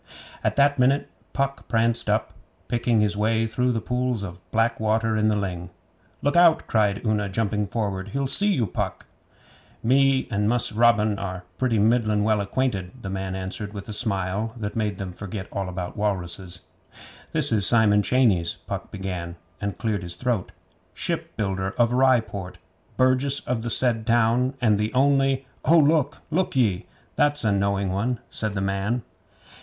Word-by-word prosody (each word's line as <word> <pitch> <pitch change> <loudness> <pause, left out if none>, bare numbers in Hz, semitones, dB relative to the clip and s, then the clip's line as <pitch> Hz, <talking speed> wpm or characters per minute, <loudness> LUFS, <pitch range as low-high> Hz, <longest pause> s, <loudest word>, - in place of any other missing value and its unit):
At - - 0
that 140 0 +3
minute 135 +3 +2 0.2
Puck 140 0 -2
pranced 115 0 +1
up, - - 0 0.3
picking 120 -2 +1
his 105 -1 +1
way 110 +2 +1
through 125 +3 0
the 115 - -1
pools 125 -2 -2
of 90 -2 -8
black 115 +1 +1
water 110 +1 +1
in 110 0 +2
the 105 - +2
ling. 90 -3 -4 0.5
'Look 145 - +1
out!' 170 -2 +5
cried 105 -1 0
Una, 105 -2 0
jumping 105 0 -1
forward. 100 -3 -3
'He'll 135 +7 -2
see 200 +10 +5
you, 130 - +1
Puck!' 90 - -4 0.8
'Me 135 +2 +3
and 105 0 +1
Mus' 120 -1 +2
Robin 110 -2 +3
are 90 -2 -5 0.2
pretty 125 -4 +1
middlin' 110 -1 +2
well 110 -1 +2
acquainted,' 100 0 -3
the 95 - -4
man 95 -1 -4
answered 100 +2 -5
with 100 -1 -7
a 105 - -5
smile 105 0 -1
that 105 -2 -5
made 105 -3 -1
them 95 -1 -6
forget 100 +1 -7
all 95 -2 -3
about 90 -1 -5
walruses. 90 -3 -2 0.7
'This - - +3
is 105 -5 +4
Simon 105 -3 +4
Cheyneys,' 105 -9 +2
Puck - - -5
began, 90 -3 -5 0.3
and 100 -1 -3
cleared 110 -4 -2
his 85 -1 -4
throat. 120 -2 -2 0.4
'Shipbuilder 95 -2 -2
of 120 0 +2
Rye 130 -1 +4
Port; 95 -4 -8 0.4
burgess 130 +2 +3
of 125 -2 -2
the 120 - -3
said 115 -2 +4
town, 120 +3 +2
and 110 -5 +2
the 105 +1 -1
only 135 0 +2
' - - -35
'Oh, 165 +4 +5
look! 145 -3 +2
Look 180 0 0
ye! 110 -6 +1 0.3
That's 145 -1 +2
a 105 - +2
knowing 100 -1 0
one,' 110 +5 -1
said 110 -2 -2
the 95 - -1
man. 100 +5 -1
110 Hz, 170 wpm, -24 LUFS, 100-125 Hz, 0.8 s, out